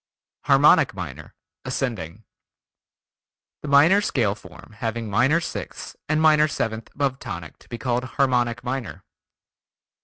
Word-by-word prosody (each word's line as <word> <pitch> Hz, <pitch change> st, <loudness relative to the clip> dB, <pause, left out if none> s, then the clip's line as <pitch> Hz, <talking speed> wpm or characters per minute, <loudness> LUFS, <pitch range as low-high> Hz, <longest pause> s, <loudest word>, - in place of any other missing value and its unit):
Harmonic -, -, +5 dB
Minor -, -, -8 dB, 0.3 s
(ascending) 110 Hz, -, -4 dB, 1.4 s
The -, -, -7 dB
minor 150 Hz, +8 st, +5 dB
scale 115 Hz, -, 0 dB
form 110 Hz, +1 st, -15 dB
having 115 Hz, 0 st, -3 dB
minor 130 Hz, +10 st, +3 dB
sixth 170 Hz, -, -7 dB
and 155 Hz, 0 st, +2 dB
major 155 Hz, -1 st, +5 dB
seventh 110 Hz, -6 st, -3 dB
above 135 Hz, -2 st, -1 dB
tonic 85 Hz, -3 st, -8 dB
to -, -, -22 dB
be 120 Hz, -, -5 dB
called 125 Hz, 0 st, -1 dB
Harmonic 125 Hz, -3 st, 0 dB
Minor. 120 Hz, -, -5 dB
125 Hz, 120 wpm, -23 LUFS, 110-140 Hz, 1.4 s, Harmonic